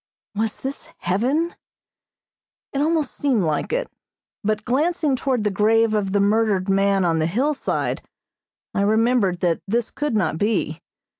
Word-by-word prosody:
Was 215 +1 -2
this 270 +1 -5
heaven? 260 - 0 1.2
It 275 - 0
almost 315 -2 +1
seemed 260 -8 +1
like 155 -3 -1
it, - - 0 0.6
but 215 0 -1
glancing 300 +2 +1
toward 255 -3 0
the 210 - +1
grave 220 +2 +3
of 205 -3 0
the 200 - +2
murdered 205 -2 +2
man 195 -1 +3
on 165 -1 +2
the 155 - +1
hillside 265 - -1 0.7
I - - 0
remembered 215 -3 +2
that 170 -2 +1
this 230 +3 0
could 295 -5 -2
not 170 -6 0
be. 200 -7 0
215 Hz, 145 wpm, -22 LUFS, 195-265 Hz, 1.2 s, grave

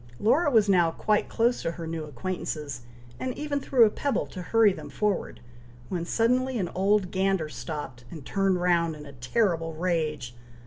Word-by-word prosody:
Laura 290 +9 +3
was 220 -6 +4
now 180 -4 +4
quite 210 +5 0
close 235 +2 +1
to 165 - -2
her 165 -1 -7
new 160 -1 -4
acquaintances, 150 -2 -4 0.4
and 255 -1 -3
even 295 -1 -2
threw 255 -4 +5
a - - +4
pebble 280 +4 -1
to 185 - -8
hurry 215 +2 +4
them - - -9
forward, 210 -3 -2 0.5
when 175 -2 -2
suddenly 250 +6 +1
an 185 -5 -2
old 195 0 +2
gander 190 -4 +1
stopped, 130 -2 -6
and 155 -5 -9
turned 195 0 +1
round 170 -2 +2
in 150 0 -10
a 140 - -11
terrible 165 - 0
rage. 155 -7 -2
180 Hz, 175 wpm, -27 LUFS, 160-215 Hz, 0.5 s, threw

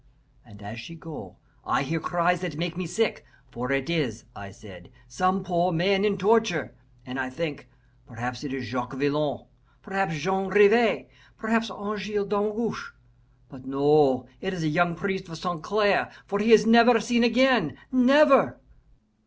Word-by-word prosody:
And 105 -3 -16
as 105 +3 -8
she 115 +9 -10
go, 160 -1 -10 0.3
I - - 0
hear 160 +4 -2
cries 175 +1 0
that 175 -5 -5
make 170 +1 -3
me 180 -1 -4
sick, 220 +5 -1 0.3
for 125 +2 -5
it 135 -1 -1
is, 140 -10 -2
I 100 0 -9
said, 95 -3 -14 0.2
some 185 +10 0
poor 175 0 0
man 190 +4 +1
in 205 -1 +1
torture, 190 - +1 0.3
and 130 +1 -6
I 130 -1 -2
think, 145 -2 -6 0.4
perhaps 125 +2 -6
it 145 - -5
is 135 -2 -5
Jacques 125 +2 -5
Villon, 145 -2 -1 0.4
perhaps 195 -5 -2
Jean 190 +5 -2
Rivas, 210 +3 +4 0.3
perhaps 225 0 0
Angele 205 +1 -4
Damgoche. 210 +2 -3 0.5
But 130 0 -14
no, 135 -2 +3
it 190 +4 -4
is 170 - -5
a 155 - 0
young 175 +2 +1
priest 190 0 -4
of 165 - -8
St. 175 -1 -4
Clair, 205 -1 +1 0.2
for 200 - -3
he 220 +3 +2
is 215 -1 +7
never 235 +1 +6
seen 235 +2 +1
again 245 0 +3
never!" 270 +2 +5
175 Hz, 160 wpm, -25 LUFS, 135-210 Hz, 0.5 s, is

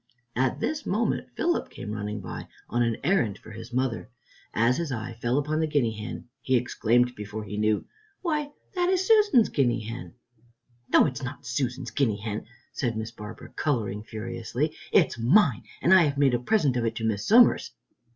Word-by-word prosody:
At 130 0 +1
this 305 -1 -2
moment 220 +4 0
Philip 345 0 0
came 105 - -7
running 105 -1 -4
by 95 - -7 0.2
on 120 - 0
an 115 -1 +1
errand 130 - +2
for - - -13
his 115 +3 -9
mother. 130 -2 -1 0.4
As 120 +3 +2
his 170 -4 -2
eye 120 -1 -4
fell 120 +3 +1
upon 150 +2 0
the 160 - +1
guinea 145 -7 +1
hen, 110 +2 -7
he 130 - +1
exclaimed 120 0 +2
before 105 0 -6
he 105 0 -6
knew, 105 0 +1 0.4
"Why, 305 -4 0 0.2
that 360 -1 +1
is 375 0 +2
Susan's 415 - +5
guinea 120 -4 +1
hen!" 115 +3 -7 0.8
"No, - - +7
it 145 - -1
is - - -9
not 125 - -6
Susan's 125 0 -2
guinea 110 -3 +1
hen," 105 +1 -5 0.3
said 120 -6 -1
Miss 110 +1 -4
Barbara, 105 -1 -10
coloring 110 -8 -1
furiously, 120 +6 -3 0.2
"it - - +6
is - - -8
mine, 135 - +4 0.2
and 180 - +6
I 190 - +8
have 140 -1 -1
made 140 -3 +4
a 120 - +2
present 145 - +2
of 120 - 0
it 115 0 -1
to 115 - -4
Miss 105 -2 -1
Somers." 235 +2 +6
120 Hz, 190 wpm, -27 LUFS, 110-150 Hz, 0.8 s, I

